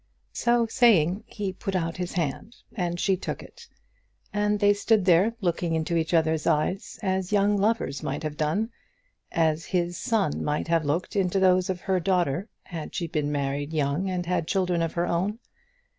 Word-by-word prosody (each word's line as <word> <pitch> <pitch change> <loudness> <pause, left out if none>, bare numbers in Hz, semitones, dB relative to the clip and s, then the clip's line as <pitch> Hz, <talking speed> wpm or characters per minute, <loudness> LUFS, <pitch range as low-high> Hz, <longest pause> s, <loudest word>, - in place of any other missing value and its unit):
So 240 -1 +2
saying 215 - +3
he 200 -4 -4
put 195 +1 -4
out 165 -2 -1
his 180 0 -4
hand, 170 - -3 0.2
and 175 -4 -2
she 195 +1 +2
took 185 - -5
it; 475 -1 -14 0.7
and 210 0 +1
they 205 0 +5
stood 205 -1 +2
there 190 +6 +4
looking 170 -2 0
into 160 +1 -1
each 160 -1 0
other's 160 -2 +2
eyes, 180 +9 0
as 190 -1 -1
young 205 0 +3
lovers 205 -8 0
might 145 +3 -3
have 155 -1 -3
done, 165 +10 0 0.6
as 160 0 +1
his 175 -1 -1
son 215 - 0
might 150 +2 -1
have 165 -2 +2
looked 160 +8 -1
into 195 -1 +1
those 185 -1 +3
of 180 -2 -2
her 190 -1 +1
daughter, 180 - 0
had 165 -3 -7
she 175 - -1
been 150 -3 -1
married 145 +1 -2
young 150 +5 0
and 180 -1 -2
had 170 -2 -1
children 180 -2 +1
of 165 -1 -1
her 170 0 0
own. 185 +6 -1
180 Hz, 180 wpm, -26 LUFS, 160-200 Hz, 0.7 s, they